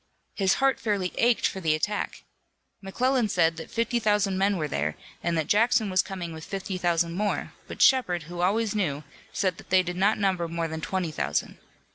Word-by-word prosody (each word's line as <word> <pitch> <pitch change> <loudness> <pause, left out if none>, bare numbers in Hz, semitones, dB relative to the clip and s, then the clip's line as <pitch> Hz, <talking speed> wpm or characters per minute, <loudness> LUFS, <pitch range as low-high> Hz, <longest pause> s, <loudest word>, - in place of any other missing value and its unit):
His 195 -2 +2
heart 270 -1 +2
fairly 200 -5 -1
ached 240 0 +3
for 190 - -1
the 160 -4 +2
attack. 205 +6 -3 0.6
McClellan 245 +4 0
said 165 -3 +2
that 160 - -8
fifty 230 +1 0
thousand 205 -3 +1
men 195 +1 +2
were 155 -3 -1
there, 75 - -2 0.3
and 170 -1 0
that 160 - 0
Jackson 220 +1 +3
was 185 0 +4
coming 180 -4 -6
with 160 0 -9
fifty 195 0 -4
thousand 170 -1 +1
more, 205 +3 -2
but - - 0
Shepard, 185 -11 +3
who 175 +3 -6
always 210 +4 +1
knew, 155 -9 -1 0.3
said 185 -4 -1
that - - -14
they 185 0 +4
did 180 0 -5
not 200 +3 +3
number 190 -4 0
more 165 0 -2
than 160 0 -5
twenty 180 -1 -2
thousand. 75 - -2
185 Hz, 195 wpm, -26 LUFS, 170-210 Hz, 0.6 s, was